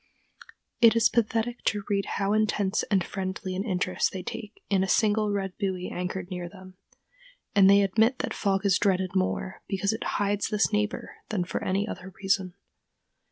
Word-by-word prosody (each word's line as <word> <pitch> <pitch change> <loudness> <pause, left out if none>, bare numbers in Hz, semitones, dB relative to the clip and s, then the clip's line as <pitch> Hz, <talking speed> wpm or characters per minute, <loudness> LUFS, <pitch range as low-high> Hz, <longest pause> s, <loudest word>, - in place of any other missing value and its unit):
It 230 -1 +7
is 230 0 +5
pathetic 230 +1 0
to 205 -2 +1
read 200 -1 0
how 200 +1 +1
intense 215 -2 +1
and 195 -3 +3
friendly 190 0 -4
an 190 - -1
interest 185 -3 0
they 185 -1 -5
take 210 -1 -8
in 195 -2 +2
a - - -1
single 210 +1 +2
red 195 -2 -2
buoy 185 -3 -2
anchored 180 +1 -4
near 180 -1 -4
them; 185 0 -13 0.8
and 195 -2 +6
they 200 0 +6
admit 220 +6 +3
that - - -3
fog 195 -1 0
is 195 -2 +4
dreaded 185 -2 +1
more 185 0 -1
because 195 +1 0
it 220 - -4
hides 205 0 0
this 215 0 +1
neighbor 210 0 -2
than 205 -4 0
for 175 - -4
any 195 +3 0
other 190 -2 -7
reason. 190 -2 +1
195 Hz, 175 wpm, -27 LUFS, 185-210 Hz, 0.8 s, It